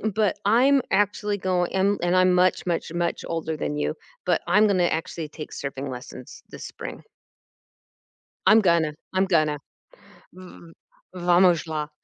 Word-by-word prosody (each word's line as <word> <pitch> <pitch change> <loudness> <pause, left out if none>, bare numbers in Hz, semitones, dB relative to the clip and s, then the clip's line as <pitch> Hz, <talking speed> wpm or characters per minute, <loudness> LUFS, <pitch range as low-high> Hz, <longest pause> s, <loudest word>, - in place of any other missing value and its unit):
but 210 -2 +1
I'm 260 +6 +4
actually 205 0 +1
going- 185 -2 -1
and 200 +2 +1
and 175 +1 +2
I'm 185 0 +4
much, 180 +1 +2
much, 170 -2 -2
much 170 0 -2
older 160 -1 -3
than 150 0 -3
you- 150 - -2 0.3
but - - +1
I'm 210 +1 +4
gonna 185 -3 +2
actually 160 -1 -3
take 155 +1 -9
surfing 140 0 -5
lessons 125 0 -10
this - - -8
spring. - - -8 1.4
I'm 215 +2 +7
gonna. 170 -5 +2 0.2
I'm 190 +1 +2
gonna. 155 -5 +1 0.7
V 185 - -15 0.7
V 180 - -8
Vamos 175 -1 +4
lá. 155 -2 -4
175 Hz, 150 wpm, -24 LUFS, 155-195 Hz, 1.4 s, I'm